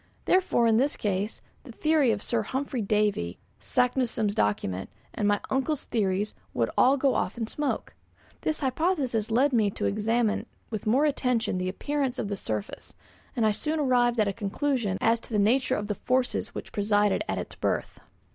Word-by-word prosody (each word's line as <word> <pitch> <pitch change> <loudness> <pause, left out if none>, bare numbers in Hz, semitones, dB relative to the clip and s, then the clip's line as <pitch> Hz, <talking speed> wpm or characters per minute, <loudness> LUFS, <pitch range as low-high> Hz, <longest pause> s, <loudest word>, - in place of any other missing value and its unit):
Therefore, 365 -10 +3
in 225 -1 +4
this 275 +4 +1
case, 205 +1 -2 0.2
the - - -10
theory 305 +1 +2
of 210 -2 0
Sir 235 -2 0
Humphry 260 +2 -3
Davy, 205 - 0 0.2
Saknussemm's 245 -4 +1
document, 95 - -1 0.2
and 205 - 0
my 205 0 +3
uncle's 270 +2 0
theories 205 -2 0 0.2
would 115 -1 +1
all 265 +3 +5
go 270 0 +2
off - - -1
in 230 - -1
smoke. 290 +6 -3 0.5
This 310 - -1
hypothesis 265 - 0
led 260 +5 +3
me 220 -4 +3
to - - -4
examine 220 +2 +1 0.2
with 215 -1 -4
more 260 +7 +4
attention 250 -9 0
the 185 0 -1
appearance 270 +5 -2
of 205 - -3
the 205 - -1
surface, 110 - -5 0.4
and 230 - +2
I 215 - +4
soon 305 +9 -2
arrived 245 -4 +2
at 210 - +3
a 200 - 0
conclusion 210 0 -1
as 230 +1 +3
to - - -16
the 215 - +1
nature 250 +6 +3
of 210 - -3
the 210 - -1
forces 250 +5 -1
which - - -6
presided 205 +1 +2
at - - -1
its - - -5
birth. - - -2
230 Hz, 180 wpm, -27 LUFS, 205-265 Hz, 0.5 s, all